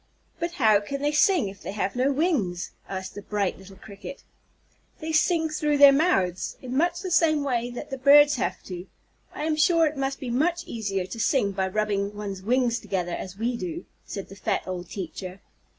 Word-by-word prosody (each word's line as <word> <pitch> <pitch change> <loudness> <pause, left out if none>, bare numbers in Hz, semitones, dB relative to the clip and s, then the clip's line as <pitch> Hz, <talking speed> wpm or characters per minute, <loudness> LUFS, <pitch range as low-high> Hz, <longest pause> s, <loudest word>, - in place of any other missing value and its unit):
"But 340 +1 -2
how 220 -9 +4
can 275 +7 -5
they 295 - +2
sing 330 - +3
if 195 0 -9
they - - -6
have 195 -2 -2
no 255 +3 +2
wings?" 265 - 0 0.2
asked 190 -1 -5
the 205 - -7
bright 200 -2 -2
little 190 0 -13
Cricket. 200 +7 -10 0.8
"They 315 +1 -4
sing 320 +1 +2
through 300 -1 0
their 285 0 +9
mouths, 275 - +1
in 255 0 -6
much 345 +4 +1
the 370 -2 -5
same 310 -3 +3
way 245 -3 -1
that 245 +4 -8
the 270 - -4
birds 290 +1 +7
have - - -2
to. 180 0 -7 0.5
I - - -4
am 310 0 +1
sure 330 +2 +4
it 305 0 -1
must 270 0 -2
be 250 -3 -4
much 335 +7 +1
easier 195 -5 -3
to 225 +5 -8
sing 220 -3 +2
by 190 -1 -1
rubbing 205 0 -1
one's 200 -2 -5
wings 240 +2 +1
together, 190 -5 -3
as 190 0 -6
we 235 +3 -1
do," 340 +6 -5 0.2
said 195 -2 -7
the 195 - -10
fat 195 - -1
old 180 -2 -5
teacher. 185 0 -6
240 Hz, 200 wpm, -26 LUFS, 195-300 Hz, 0.8 s, their